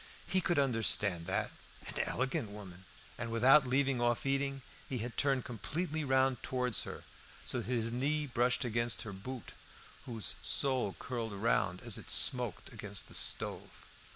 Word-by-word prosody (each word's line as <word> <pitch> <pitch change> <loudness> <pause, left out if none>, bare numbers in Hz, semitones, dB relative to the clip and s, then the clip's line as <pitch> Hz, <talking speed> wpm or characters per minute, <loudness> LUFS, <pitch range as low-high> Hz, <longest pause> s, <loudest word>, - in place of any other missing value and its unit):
He 190 - +2
could 175 -2 0
understand 110 -9 +2
that; 95 - -1 0.3
an - - -4
elegant 130 -4 -1
woman! 95 -3 -10 0.3
and, 120 -1 -3
without 130 +5 +6
leaving 135 -1 +2
off 120 +1 +1
eating, 135 -1 0 0.3
he 130 - -2
had 115 +1 -5
turned 135 -3 +1
completely 155 - -3
round 130 -2 +2
towards 125 -3 0
her, - - -7 0.4
so - - -1
that - - -5
his 115 -2 +1
knee 145 +5 +1
brushed 125 -1 +1
against 115 0 0
her 100 - -7
boot, 125 +5 -7 0.6
whose 115 -4 +1
sole 130 -7 +2
curled 115 -4 -4
round 95 -3 0
as - - -2
it - - -10
smoked 125 -7 +2
against - - -4
the - - -11
stove. - - -1
125 Hz, 155 wpm, -33 LUFS, 110-135 Hz, 0.6 s, without